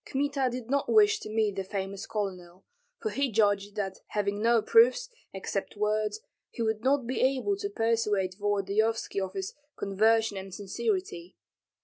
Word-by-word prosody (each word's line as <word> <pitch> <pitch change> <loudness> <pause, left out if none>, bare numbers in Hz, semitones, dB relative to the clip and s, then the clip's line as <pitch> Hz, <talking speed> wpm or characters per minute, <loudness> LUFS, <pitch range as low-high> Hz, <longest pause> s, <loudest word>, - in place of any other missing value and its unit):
Kmita 275 -1 0
did 245 -2 -5
not 280 +2 0
wish 430 0 +5
to - - -8
meet 215 -2 0
the 195 - -1
famous 195 0 -5
colonel, 185 -4 -5 0.3
for 435 - -2
he 275 -2 0
judged 205 -1 +2
that 195 -2 -3
having 205 0 -1
no 230 +1 +4
proofs, 480 +1 +5 0.2
except 195 +1 -4
words, 210 0 0 0.3
he 235 - -4
would 220 0 -1
not 270 -1 +2
be 255 +2 -2
able 270 +10 +2
to 405 0 -3
persuade 225 - 0
Volodyovski 205 +1 0
of 190 0 -4
his 195 -1 -4 0.2
conversion 220 +1 +2
and 190 -1 -7
sincerity. 370 - -3
215 Hz, 155 wpm, -29 LUFS, 200-270 Hz, 0.3 s, wish